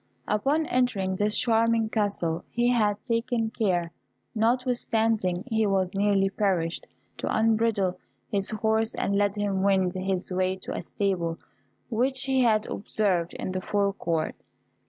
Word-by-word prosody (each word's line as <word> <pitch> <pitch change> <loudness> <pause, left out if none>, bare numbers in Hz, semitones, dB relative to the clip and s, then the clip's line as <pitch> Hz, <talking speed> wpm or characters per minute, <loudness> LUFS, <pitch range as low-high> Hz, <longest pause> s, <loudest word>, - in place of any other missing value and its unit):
Upon 275 +10 +1
entering 230 -9 0
this 210 +2 0
charming 230 -1 +2
castle 200 -7 -1
he 240 +1 +1
had 210 -4 +1
taken 230 -2 -1
care, 180 -8 0 0.4
notwithstanding 225 -5 +1
he 220 -4 +1
was 190 -2 0
nearly 195 -1 +2
perished, 185 -5 -1 0.3
to - - -4
unbridle 220 -4 +1 0.3
his 195 -1 0
horse 220 +1 0
and 200 - 0
let 205 0 +2
him 200 -2 -1
wend 190 -2 +2
his 185 0 -2
way 185 0 +1
to 190 - -7
a - - -3
stable 175 -2 -1 0.5
which 260 +3 0
he 265 -1 +2
had 220 -3 +3
observed 190 -5 -1
in - - -4
the 185 0 -3
fore 200 +1 0
court. 165 -4 -1
205 Hz, 140 wpm, -26 LUFS, 190-225 Hz, 0.5 s, had